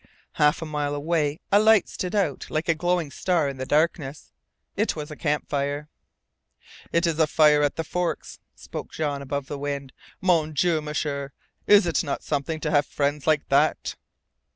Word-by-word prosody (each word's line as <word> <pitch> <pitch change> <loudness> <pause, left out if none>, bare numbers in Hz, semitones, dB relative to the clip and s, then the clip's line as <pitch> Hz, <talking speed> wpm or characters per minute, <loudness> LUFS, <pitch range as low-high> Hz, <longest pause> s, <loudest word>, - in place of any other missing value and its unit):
Half 150 +2 +2
a - - -4
mile 150 -2 -2
away 150 0 0
a 200 - +6
light 220 -2 +5
stood 180 +3 -4
out 180 -10 0
like 155 +3 -2
a 165 - +4
glowing 175 -2 0
star 170 -3 +1
in 135 -1 -4
the 130 0 -5
darkness. 150 -2 0 0.4
It 215 +3 0
was 150 -1 -6
a - - -6
campfire. 145 -1 -2 1.0
"It 170 +1 +2
is 165 -2 0
a 160 - +4
fire 150 -1 +5
at 145 -1 +1
the 165 - -2
Forks," 180 +2 -3 0.2
spoke - - -8
Jean 145 -3 -2
above 140 0 -3
the 145 +1 -6
wind. 140 -2 -4 0.3
"Mon 165 -4 +2
Dieu, 160 +1 +2
M'sieur 145 -2 -3 0.3
is 205 -1 +7
it 170 - +1
not 145 - -3
something 155 +2 -2
to 155 - -1
have 145 -1 +3
friends 145 +1 -1
like 155 -2 +2
that!" - - +2
150 Hz, 175 wpm, -25 LUFS, 145-165 Hz, 1.0 s, is